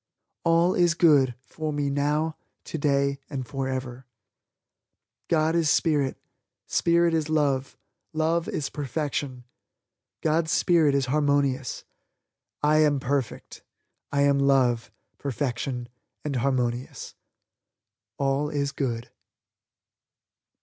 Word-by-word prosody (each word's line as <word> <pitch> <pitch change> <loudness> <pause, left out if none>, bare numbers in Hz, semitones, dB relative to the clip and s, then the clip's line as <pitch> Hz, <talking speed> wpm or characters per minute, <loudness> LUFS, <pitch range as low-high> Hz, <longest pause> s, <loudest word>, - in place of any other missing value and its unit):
All 170 +2 +3
is 175 -1 +3
Good 140 -7 +4
for 155 +3 -5
me 145 -1 -1
now, 150 +3 0 0.3
today 140 -2 0
and 130 -2 -4
forever. 130 -2 -4 1.2
God 160 -1 +2
is 165 -3 +2
spirit; 145 -6 +2 0.5
spirit 170 0 +2
is 155 -2 0
love; 140 -4 0 0.3
love 165 +2 0
is 145 - -2
perfection; 145 -3 -3 0.8
God's 160 +1 +1
spirit 160 -5 +3
is 140 -1 +2
harmonious, 140 -2 0 0.8
I 150 +1 +4
am 150 -2 +3
perfect, 135 -1 -3 0.5
I 140 0 +2
am 140 0 +3
love, 130 -5 +2 0.3
perfection 125 -2 -3 0.4
and 140 -3 -1
harmonious. 125 -1 -2 1.0
ALL 140 +2 0
IS 140 -2 -1
GOOD. 120 -4 -3
140 Hz, 100 wpm, -26 LUFS, 135-155 Hz, 1.2 s, Good